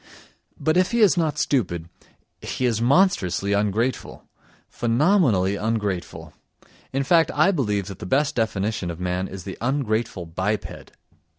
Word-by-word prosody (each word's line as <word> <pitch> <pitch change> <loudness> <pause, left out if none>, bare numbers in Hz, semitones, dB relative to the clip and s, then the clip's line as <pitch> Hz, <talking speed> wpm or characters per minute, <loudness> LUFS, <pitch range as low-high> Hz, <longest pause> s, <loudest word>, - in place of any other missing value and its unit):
But 155 +2 +1
if 185 0 +3
he 235 - +2
is 205 -4 +5
not 160 -4 0
stupid, 85 - -1 0.5
he 130 - -3
is 115 -2 0
monstrously 115 - +2
ungrateful! 105 +5 -1 0.4
Phenomenally 120 - +2
ungrateful. 105 -5 -3 0.6
In 135 +1 0
fact, 165 +2 +4
I 195 - +4
believe 105 - -1
that 100 -2 -9
the - - -7
best 140 +7 +1
definition 110 -4 -1
of 85 0 -6
man 90 +1 -2
is 95 -2 -8
the 95 - -8
ungrateful 115 -7 -1
biped. 95 +6 -4
110 Hz, 135 wpm, -23 LUFS, 95-140 Hz, 0.6 s, is